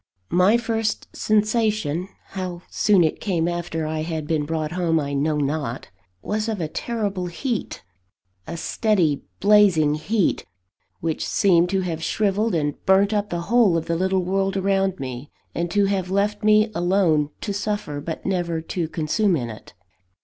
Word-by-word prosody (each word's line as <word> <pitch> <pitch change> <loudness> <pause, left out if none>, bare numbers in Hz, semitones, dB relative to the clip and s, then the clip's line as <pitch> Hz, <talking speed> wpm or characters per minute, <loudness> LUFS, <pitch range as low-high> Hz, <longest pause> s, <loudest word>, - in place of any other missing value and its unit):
My 185 +6 +5
first 225 -2 -2
sensation 215 -6 +1 0.2
(how 180 -2 -5
soon 200 -4 +4
it 160 - -1
came 170 -5 0
after 175 -2 -3
I 155 0 -2
had 160 -1 -3
been 150 -1 -1
brought 160 -1 -2
home, 170 -2 +1
I 140 -1 -3
know 150 +2 +1
not) 140 -4 -2 0.3
was 215 +1 -1
of 215 -3 -2
a 160 - -1
terrible 200 -1 -3
heat; 230 +6 -4 0.6
a - - -5
steady, 175 -6 +1 0.2
blazing 200 -8 +5
heat, 190 +6 0 0.6
which 160 -1 -2
seemed 180 -4 +3
to 190 0 +1
have 165 -3 -3
shrivelled 210 +3 0
and 145 -2 -2
burnt 195 +2 +4
up 210 0 0
the 170 0 -2
whole 205 -2 +3
of 165 - -3
the 170 - -1
little 190 +1 +1
world 195 +1 0
around 195 -1 +1
me, 130 +2 -6 0.2
and 170 +1 -2
to 200 +3 +2
have 195 -2 -1
left 205 +2 0
me 215 +1 +4
alone 175 -5 +2
to 205 - -3
suffer, 200 -7 -3
but 160 +2 -6
never 175 -3 -1
to 165 +1 -3
consume 175 +5 +1
in 120 -6 -3
it. 105 -4 -13
180 Hz, 165 wpm, -23 LUFS, 160-205 Hz, 0.6 s, My